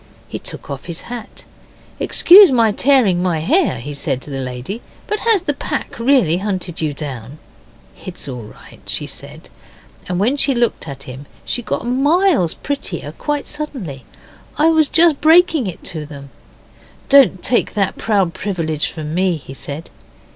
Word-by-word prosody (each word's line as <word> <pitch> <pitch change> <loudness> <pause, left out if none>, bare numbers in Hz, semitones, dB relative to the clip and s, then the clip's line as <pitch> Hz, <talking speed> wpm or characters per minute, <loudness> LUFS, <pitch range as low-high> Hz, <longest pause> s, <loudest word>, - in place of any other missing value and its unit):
He - - -6
took - - -8
off 140 -1 -6
his 170 -2 -5
hat. 240 -2 -9 0.5
'Excuse 380 0 +7
my 230 -4 +3
tearing 225 -7 +3
my 180 -3 0
hair,' 295 - +1
he 145 +5 -6
said 140 -2 -2
to 150 - -10
the 135 -1 -3
lady, 130 - -6 0.2
'but 425 - -2
has 440 -6 +2
the 290 - 0
pack 265 - -5
really 230 - +3
hunted 185 -4 -3
you 155 -2 0
down?' 140 -2 -7 0.7
'It's 180 -5 -7
all 125 -3 -6
right,' 105 - -14
she - - 0
said, - - -10 0.6
and 180 0 -1
when 245 +8 +1
she 275 -1 +2
looked 235 -7 0
at 140 -1 -7
him 130 +3 -10 0.2
she 245 - -2
got 235 - -3
miles 280 - +2
prettier 190 - -4
quite 295 -1 -2
suddenly. 255 - -6 0.5
'I 310 +2 +4
was 315 -2 +3
just 325 -3 +4
breaking 320 - +4
to 155 -3 -4
them...' 140 -2 -11 0.8
'Don't 270 -10 +5
take 240 - +1
that 200 -2 0
proud 195 -6 +1
privilege 165 -6 -2
from 155 -2 -6
me,' 180 -1 +1
he 135 -2 -11
said. 145 +3 -7
195 Hz, 160 wpm, -18 LUFS, -, 0.8 s, Excuse